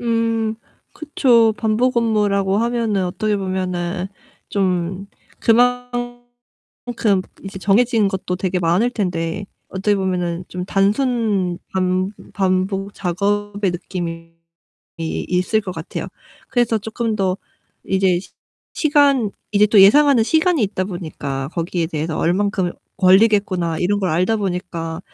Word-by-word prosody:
음. 230 -1 0 0.4
그쵸. 245 -7 +3
반복 240 +2 +1
업무라고 205 -4 +2
하면은 230 -4 0
어떻게 205 +4 -1
보면은 185 -1 -3 0.4
좀 185 0 -1 0.3
그만큼 245 -3 -1 0.2
이제 195 0 -7
정해진 220 +1 +3
것도 190 -2 -3
되게 185 0 -1
많을 180 +8 +2
텐데 180 -2 -2 0.2
어떻게 200 +2 0
보면은 180 -3 -2
좀 180 0 -5
단순 200 -2 +1
반 185 +1 0 0.2
반복 195 +1 0
작업의 205 +2 -1
느낌이 170 -2 -5 0.7
있을 180 +5 -1
것 190 -3 -6
같아요. 160 -1 -6 0.4
그래서 240 -3 +1
쪼끔 220 +1 -3
더 190 -2 0 0.5
이제 190 -2 +2
시 - - -15 0.4
시간 285 - +3 0.2
이제 210 0 +5
또 210 -1 +5
예상하는 265 +4 +6
시간이 320 +2 +2
있다 190 -2 -1
보니까 145 -7 -5
거기에 170 0 -1
대해서 160 -1 -3
'얼만큼 190 0 0 0.3
걸리겠구나.' 190 -3 +3
이런 205 +3 +1
걸 190 - 0
알다 180 +7 +1
보니까 175 -4 -4
195 Hz, 255 characters per minute, -20 LUFS, 180-225 Hz, 0.7 s, 예상하는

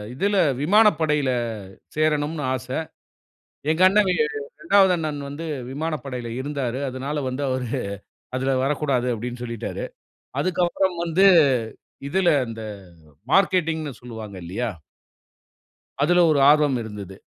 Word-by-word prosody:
இதில, 200 +6 +1 0.3
விமானப்படையில 155 -8 +3 0.7
சேரணும்னு 155 0 0
ஆச! 130 0 -6 1.0
எங்க 160 +3 -1
அண்ணவே 195 -2 +3 0.5
2வது 190 +1 +5
அண்ணன் 155 -3 -3
வந்து 150 +4 -6 0.3
விமானப்படையில 135 -5 -4
இருந்தாரு. 135 -3 -3
அதனால 135 +3 -3
வந்து 130 +2 -4
அவரு 130 -2 -2 0.7
"அதில 130 +1 0
வரக்கூடாது" 135 -3 0
அப்படின்னு 120 +2 -6
சொல்லிட்டாரு. 115 -2 -5 0.6
அதுக்கப்பறம் 180 +1 0
வந்து, 170 +4 +3 0.8
இதில 185 +2 +2 0.2
இந்த 110 0 -7 0.5
அ - - -26 0.2
மார்க்கெட்டிங்ன்னு 165 -6 +2
சொல்லுவாங்க 110 -4 -8
இல்லையா. 110 +8 -2 1.3
அதில 175 +3 +4
ஒரு 145 - +3
ஆர்வம் 150 -3 +4
இருந்தது. 100 -3 -8
150 Hz, 105 wpm, -23 LUFS, 125-170 Hz, 1.3 s, 2வது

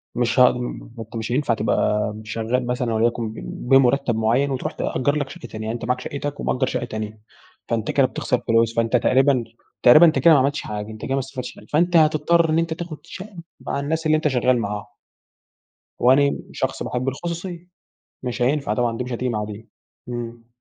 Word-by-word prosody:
مش 120 0 +1
هاقد 125 0 +6
ما 125 -1 -6
أنتَ 115 +1 -9
مش 115 +1 -3
هينفع 130 -1 +1
تبقى 105 -1 0
شغال 115 +3 -2
مثلًا 125 -1 -1
وليكُن 115 0 0
بم - - -8
بمرتب 135 -2 +4
معيّن 120 +6 +1
وتروّح 130 - -2
تأجر 145 +3 -1
لَك 145 -2 -2
شقة 120 - -9
تانية، 110 0 -7
يعني 110 - -2
أنتَ 115 - -7
معاك 125 +1 0
شقتك 145 +2 -5
ومأجر - - 0
شقة 120 - -2
تانية. 110 -1 -6 0.5
فأنتَ 115 -2 -1
كده 140 - +4
بتخسر 125 -1 -1
فلوس، 115 0 +3
فأنتَ 115 +1 +2
تقريبًا 130 +1 +3 0.4
تقريبًا 150 +8 +9
أنتَ 155 -5 +3
كده 165 +5 +6
ما 145 - +6
عملتش 140 +2 +1
حاجة، 105 0 -5
أنتَ 110 -1 -10
كده 135 - -2
ما - - +1
استفدتش 130 -1 -6
حاجة، - - -14
فأنتَ 175 +3 +2
هتضطر 155 +2 +3
إن 160 +1 +3
أنتَ 165 -1 -1
تاخد 165 -2 -7
شقة 195 +1 -10 0.2
مع - - -3
الناس 160 +3 -2
اللي 155 - +4
أنتَ 155 - 0
شغال 125 -1 +2
معاهم. 105 -1 -3 1.1
وأنا 140 +3 +4
شخص - - -2
باحب 125 +1 -3
الخصوصية، 170 +4 -6 0.6
مش 125 0 -4
هينفع 135 -3 +1
طبعًا 115 0 0
دي - - -2
مش 125 - -7
هتيجي 125 +2 -2
مع 105 -3 -1
دي. 105 +1 -9 0.4
امم. 120 -1 -6
125 Hz, 195 wpm, -22 LUFS, 115-145 Hz, 1.1 s, تقريبًا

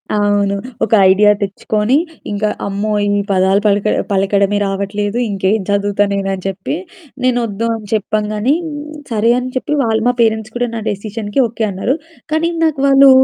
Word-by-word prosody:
అవును. 205 -1 +1 0.3
ఒక 225 - 0 0.2
ఐడియా 210 +2 +5
తెచ్చుకొని, 210 +5 0 0.3
ఇంకా 210 +1 0 0.2
అమ్మో! 200 +2 -2 0.3
ఈ - - +2
పదాలు 190 +1 +3
పలక 200 0 +2 0.3
పలకడమే 200 +1 +2
రావట్లేదు. 200 +2 -2
ఇంకేం 195 +2 0
చదువుతా 205 0 +1
నేనని 195 -1 -2
చెప్పి, 195 +9 -3 0.5
నేనొద్దో 230 -3 0
అని 215 -2 -9
చెప్పంగానే 215 +5 0 0.6
సరే 225 +1 +2
అని 255 +1 -4
చెప్పి 295 +3 -1
వాళ్ళు 220 -1 +1
మా 245 - +3
పేరెంట్స్ 220 -1 +1
కూడా 245 0 0
నా 225 - -3
డెసిషన్‌కి 210 +3 -3
ఓకే 225 0 -2
అన్నారు. 195 +8 -1 0.4
కానీ 325 +2 +1 0.2
నాకు 305 -4 0
వాళ్ళు 275 0 +7
210 Hz, 145 wpm, -16 LUFS, 200-230 Hz, 0.6 s, వాళ్ళు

